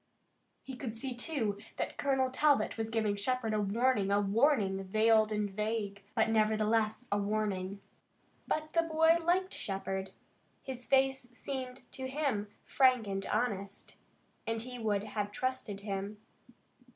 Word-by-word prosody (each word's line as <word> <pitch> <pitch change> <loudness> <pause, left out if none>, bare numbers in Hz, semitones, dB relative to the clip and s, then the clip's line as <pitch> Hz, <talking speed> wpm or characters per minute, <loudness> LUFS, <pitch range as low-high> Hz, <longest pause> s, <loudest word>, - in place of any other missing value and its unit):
He 265 - -7
could 245 -3 -5
see, 260 +3 -3
too, 240 -6 -1 0.2
that - - -2
Colonel 265 -2 +2
Talbot 290 +2 +3
was 225 -1 -3
giving 220 -2 +1
Shepard 225 +2 -1
a 215 - +1
warning, 210 0 +2
a 200 0 +3
warning, 205 -2 +2
veiled 215 +2 +4
and 210 -1 0
vague, 205 0 -2
but 220 - +3
nevertheless 220 +1 +2
a 205 - +2
warning. 200 -2 -1 0.7
But 310 0 -2
the 335 - +4
boy 325 0 +4
liked 365 +3 +1
Shepard. 195 -1 -3 0.5
His 250 -2 -7
face 265 -1 +3
seemed 255 -1 -5
to 260 -1 -5
him 260 -7 -1 0.2
frank 255 -4 +4
and 195 -1 -3
honest, 200 -3 -2 0.5
and 225 0 0
he 250 +2 -5
would 210 -3 0
have 210 -1 -3
trusted 255 -5 -3
him. 200 0 -4
220 Hz, 140 wpm, -32 LUFS, 205-260 Hz, 0.7 s, veiled